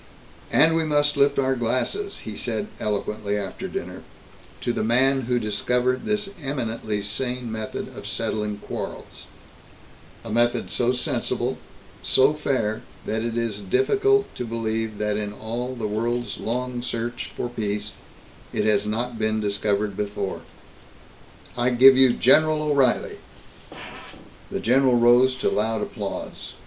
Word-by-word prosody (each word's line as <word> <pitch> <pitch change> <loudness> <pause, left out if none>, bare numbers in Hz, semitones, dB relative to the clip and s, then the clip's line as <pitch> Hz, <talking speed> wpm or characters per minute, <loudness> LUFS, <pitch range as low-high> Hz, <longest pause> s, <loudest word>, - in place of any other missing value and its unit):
"And 160 +1 +6
we 165 - +2
must 145 -1 +2
lift 140 0 +3
our 135 -1 +2
glasses," 130 - -1
he - - -5
said 205 - -2
eloquently 105 0 -2
after 100 -2 -4
dinner, - - -6 0.6
"to 120 - -1
the - - -1
man 130 +4 +4
who 125 - +3
discovered 125 +4 0
this 210 -1 0
eminently 115 -6 -2
sane 125 +3 -3
method 110 -1 -5
of - - -8
settling 105 -1 -2
quarrels - - -7 1.0
a 115 - -5
method 120 +2 +2
so 120 0 +2
sensible, 125 -1 -1 0.4
so 135 +3 +4
fair 130 -8 -1 0.2
that 110 +1 -1
it 115 0 -2
is 115 -3 -2
difficult 400 - +2
to - - -4
believe 110 -2 -2
that 105 0 -1
in 105 -1 -3
all 120 +4 -4
the 115 -3 -4
world's 120 +3 -2
long 125 +1 -2
search 120 0 -4
for - - -2
peace, 105 -3 -3 0.6
it - - -1
has 105 -1 +2
not 115 +2 -2
been 110 0 +1
discovered 100 0 0
before. 100 -1 -3 1.1
I 120 0 +2
give 130 +2 +8
you 130 -2 +6
General 155 +5 +4
O'Reilly!" 140 -5 +1 1.3
The - - -3
general 130 +1 +3
rose 120 +2 +5
to 130 - 0
loud 110 +1 0
applause. 100 -2 -5
120 Hz, 135 wpm, -24 LUFS, 105-130 Hz, 1.3 s, give